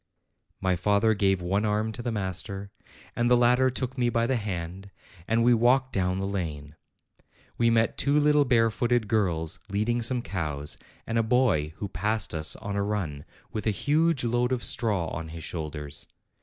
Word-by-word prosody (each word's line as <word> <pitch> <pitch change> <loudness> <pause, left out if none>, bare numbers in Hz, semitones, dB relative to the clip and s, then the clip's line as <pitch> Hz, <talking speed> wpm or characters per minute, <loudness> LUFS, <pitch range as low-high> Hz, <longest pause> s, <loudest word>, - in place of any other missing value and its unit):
My 95 -1 +1
father 105 +5 +2
gave 95 -2 +1
one 95 +4 0
arm 110 +1 0
to 120 - -6
the 120 0 -2
master, 100 0 -4 0.4
and 120 0 +1
the 125 - +6
latter 125 +2 +4
took 130 +1 -4
me 120 -1 +2
by 115 0 +1
the 130 +2 +1
hand, 95 -3 -4 0.4
and 115 +1 +2
we 120 +1 +5
walked 125 +3 +3
down 90 -1 0
the 95 - -2
lane. 80 -7 -4 0.8
We 115 0 +4
met 115 -1 +2
two 145 +1 +3
little 150 0 +4
barefooted 120 -1 +2
girls 90 -8 0
leading 110 +4 0
some 120 +1 0
cows, 75 -7 -4 0.3
and 115 0 0
a - - +5
boy 110 - +2
who 100 - -4
passed 105 +2 -2
us 80 -1 0
on 105 -2 -5
a 100 - 0
run, 95 -9 -3 0.3
with 110 0 -3
a - - +5
huge 150 - +1
load 120 +1 +1
of 125 -2 -1
straw 105 -7 +1
on 80 -1 -5
his 80 0 -8
shoulders. 75 -3 -4
105 Hz, 180 wpm, -27 LUFS, 90-120 Hz, 0.8 s, the